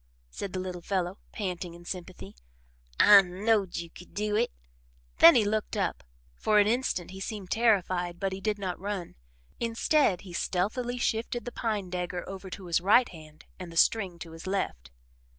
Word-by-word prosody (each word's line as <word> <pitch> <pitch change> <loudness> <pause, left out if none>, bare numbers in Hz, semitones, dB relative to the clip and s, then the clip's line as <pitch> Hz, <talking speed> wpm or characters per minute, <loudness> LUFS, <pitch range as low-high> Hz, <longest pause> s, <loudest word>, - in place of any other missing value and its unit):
said 195 - -5
the 185 - -3
little 180 -1 -5
fellow, 185 +1 -2
panting 180 -4 -4
in 175 0 -14
sympathy. 175 - -7 0.6
"I 205 -1 +9
knowed 195 +1 0
you 170 -1 -5
could 180 - -14
do 210 0 -1
it." - - +1 0.7
Then 165 - +10
he 220 - +4
looked 215 +1 -1
up. 190 -4 -1 0.3
For 210 - +1
an 205 - +6
instant 220 -6 0
he 190 - -9
seemed 195 -1 -6
terrified 185 -6 +1
but 195 -1 -1
he 190 - -6
did 210 +1 0
not 190 -3 -4
run. 195 -2 -4 0.5
Instead 230 - +2
he 185 -3 -11
stealthily 225 +9 -1
shifted 235 +1 -1
the 245 - -5
pine 210 -6 -2
dagger 180 -1 -3
over 190 0 -7
to 185 0 -8
his 170 0 +1
right 215 +7 +5
hand 155 -2 -14
and 180 -2 -7
the 165 - -8
string 190 -2 +3
to 165 -1 -9
his 165 +2 -10
left. 65 - -2
190 Hz, 180 wpm, -28 LUFS, 175-210 Hz, 0.7 s, Then